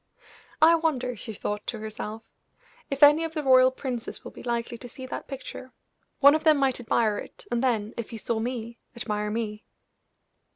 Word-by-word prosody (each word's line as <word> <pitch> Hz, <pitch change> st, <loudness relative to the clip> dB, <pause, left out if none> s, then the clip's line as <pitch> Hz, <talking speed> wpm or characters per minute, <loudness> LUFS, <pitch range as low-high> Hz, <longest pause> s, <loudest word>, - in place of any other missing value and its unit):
"I 330 Hz, +1 st, +8 dB
wonder," 280 Hz, -7 st, 0 dB
she 220 Hz, -, -6 dB
thought 205 Hz, 0 st, -4 dB
to 235 Hz, -, -2 dB
herself, 215 Hz, 0 st, -6 dB, 0.7 s
"if 275 Hz, +1 st, +1 dB
any 295 Hz, +3 st, +8 dB
of 325 Hz, 0 st, -4 dB
the 305 Hz, -, -1 dB
royal 255 Hz, -1 st, +7 dB
princes 255 Hz, -2 st, -5 dB
will -, -, -8 dB
be -, -, -11 dB
likely 235 Hz, -1 st, -2 dB
to 245 Hz, -, -9 dB
see 260 Hz, +2 st, -9 dB
that 260 Hz, -, -6 dB
picture. 260 Hz, -1 st, -8 dB, 0.5 s
One 285 Hz, +1 st, +9 dB
of 310 Hz, 0 st, 0 dB
them 310 Hz, -2 st, +6 dB
might 270 Hz, -3 st, +1 dB
admire 225 Hz, -2 st, +1 dB
it, -, -, -11 dB
and 240 Hz, +1 st, 0 dB
then, 225 Hz, -3 st, 0 dB
if 235 Hz, -, -4 dB
he 225 Hz, -, -6 dB
saw 225 Hz, +1 st, -2 dB
me, 235 Hz, 0 st, -4 dB, 0.2 s
admire 210 Hz, -3 st, -2 dB
me." 210 Hz, -1 st, -3 dB
245 Hz, 190 wpm, -27 LUFS, 225-270 Hz, 0.7 s, One